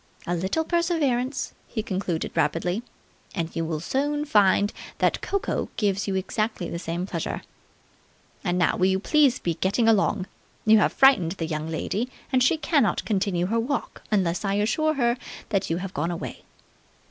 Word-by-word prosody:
"A 175 - -1
little 190 - 0
perseverance," 295 -7 0
he 220 - -3
concluded 185 -5 -2
rapidly, 175 +5 0 0.5
"and 165 -1 -3
you 165 - 0
will 160 -1 -2
soon 290 - -1
find 205 -5 +4 0.2
that - - +1
cocoa 400 0 -1
gives 200 -2 0
you 195 - -1
exactly 200 0 -1
the 170 - -3
same 170 +1 -3
pleasure. - - -4 1.0
And 180 -2 0
now 175 - +2
will 185 - +3
you 190 0 +2
please 280 +3 +3
be 170 - -1
getting 200 +7 +1
along. 205 -3 +3 0.4
You 220 0 +7
have - - +3
frightened 220 -12 +5
the 170 -4 -4
young 155 0 -3
lady, 205 +9 -2 0.2
and 255 - +4
she 260 +6 +4
cannot 290 -7 +1
continue 190 -4 0
her 225 +5 +1
walk 270 +5 -3
unless 185 -4 +1
I 195 -1 0
assure 310 +10 +1
her 240 -2 +2 0.3
that 195 -2 0
you 165 - 0
have 185 +1 -5
gone 150 +4 -1
away." 175 - -6
200 Hz, 170 wpm, -25 LUFS, 175-250 Hz, 1.0 s, You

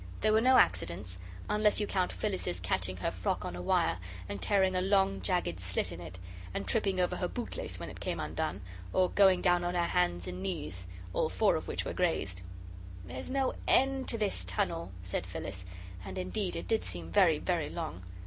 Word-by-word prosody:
There 215 0 +4
were 220 - +5
no 255 +2 +6
accidents 90 +1 +2 0.3
unless 210 0 +3
you 210 - +1
count 185 -3 0
Phyllis's 190 - -2
catching 95 +1 -1
her 90 - -1
frock - - -2
on 90 - -4
a 90 - -5
wire, 90 0 +2 0.3
and 100 - -5
tearing 190 -2 +3
a 185 - +2
long, 195 0 +3
jagged 175 - 0
slit 90 0 -1
in 85 0 -7
it, 85 +1 -8 0.4
and 100 - -2
tripping 190 - +2
over 180 - +1
her - - 0
bootlace - - -4
when - - -5
it - - -10
came - - -2
undone, 95 +3 -2 0.3
or 185 -1 +3
going 190 -3 +5
down 175 -1 +4
on 175 +1 -1
her 175 - +3
hands 90 - +1
and 90 0 -5
knees, 90 -1 -3 0.3
all - - +1
four - - +3
of - - -3
which - - -2
were - - -3
grazed. 90 0 0 0.6
"There's 90 - -6
no 265 0 +1
end 270 0 +4
to 230 - 0
this 205 - -1
tunnel," 90 -1 -1
said 90 -1 -2
Phyllis 90 +2 -5 0.4
and - - -7
indeed 185 +1 -2
it - - -4
did 225 -1 +1
seem 85 -1 -3
very - - +5
very - - -1
long. 85 +4 -5
105 Hz, 200 wpm, -32 LUFS, -, 0.6 s, no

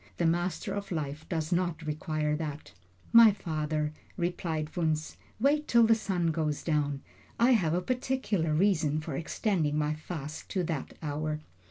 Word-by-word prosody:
The 170 - +1
Master 175 +4 0
of 200 -1 -5
Life 155 -1 -4
does 160 -3 -2
not 175 -2 0
require 155 -1 -1
that." 150 -2 -5 0.4
"My 230 -2 +10
father," 155 -4 -2 0.2
replied 165 -3 -2
Wunzh, 155 -2 0 0.2
"wait 295 +5 +2
till 235 -1 +6
the 225 0 +6
sun 185 -6 0
goes 155 -2 -1
down. 145 -3 0 0.4
I 240 +2 +5
have 175 -9 +3
a 180 - +1
particular 245 -8 0
reason 155 -3 +2
for 155 -2 -5
extending 165 -1 0
my 150 0 +1
fast 155 -1 -7
to 185 -3 0
that 160 -5 -4
hour." 150 +1 -2
160 Hz, 155 wpm, -30 LUFS, 150-185 Hz, 0.4 s, My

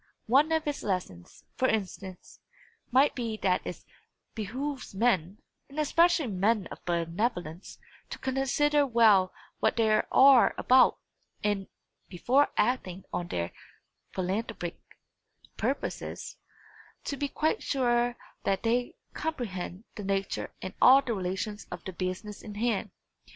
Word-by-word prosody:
One 280 +7 +4
of 320 -1 +1
its 295 -1 -2
lessons, 180 - -4
for 260 - +3
instance, 190 -4 -4 0.5
might 265 +4 +4
be 230 -3 -3
that 185 -1 +2
it - - -7 0.5
behooves 250 +3 -5
men, 195 -4 +1 0.3
and 280 - -13
especially 335 +1 +3
men 205 -1 +1
of - - -10
benevolence, 175 +1 -2 0.3
to - - -6
consider 275 +2 +1
well 220 -6 +5 0.3
what - - +2
they 220 -1 +3
are 260 +4 +6
about, 255 +1 +5 0.5
and, 205 -2 0 0.4
before 255 +10 +2
acting 190 -7 0
on 175 - -2
their 85 - -3 0.6
philanthropic 190 -1 -3 0.8
purposes, - - -3 0.7
to 280 - -3
be 285 +1 -2
quite 310 +3 0
sure 240 -2 +1 0.3
that 195 -1 0
they 240 +2 0 0.2
comprehend 205 - -4
the 205 - -5
nature 195 0 -2
and 185 - -5
all 270 +2 +8
the 240 - -2
relations 195 +2 -4
of 175 -1 -7
the 190 - -5
business 185 +4 -4
in 210 -2 -9
hand. 225 -1 0
220 Hz, 125 wpm, -29 LUFS, 190-260 Hz, 0.8 s, all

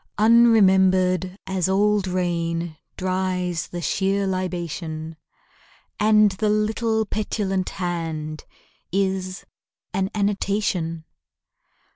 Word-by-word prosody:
Unremembered 190 -5 +4
as 190 -1 -1
old 205 0 +2
rain 170 -2 -1 0.2
Dries 185 -2 -1
the 175 - -6
sheer 195 +5 0
libation; 170 -4 -4 0.8
And 215 -1 +5
the 210 +3 -1
little 220 +1 +1
petulant 200 -3 -2
hand 165 -4 -4 0.5
Is 190 -1 -1 0.5
an 190 +1 0
annotation. 200 -5 -1
185 Hz, 80 wpm, -23 LUFS, 175-205 Hz, 0.8 s, And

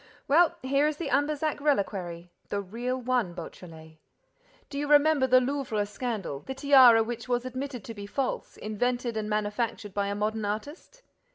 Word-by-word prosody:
Well, 325 +4 +4
here 275 +3 +2
is 305 -1 -2
the 315 -5 -4
Ambazac 295 +3 0
reliquary, 190 - -1 0.2
the 205 - -1
real 240 +6 -3
one, 245 -8 0
Beautrelet! 160 -2 -10 0.7
Do 280 - -3
you 290 - -2
remember 295 -2 +5
the 255 0 +6
Louvre 255 -5 -1
scandal, 210 - -4
the 265 - -7
tiara 260 -5 +7
which 235 +2 -6
was 245 0 0
admitted 255 -2 -5
to 230 - -7
be 205 -2 -8
false, 265 +5 -3
invented 240 +2 -2
and 215 -1 -3
manufactured 210 0 -2
by 200 0 -1
a 200 - -2
modern 215 +1 -1
artist? 290 - -6
240 Hz, 165 wpm, -28 LUFS, 205-275 Hz, 0.7 s, tiara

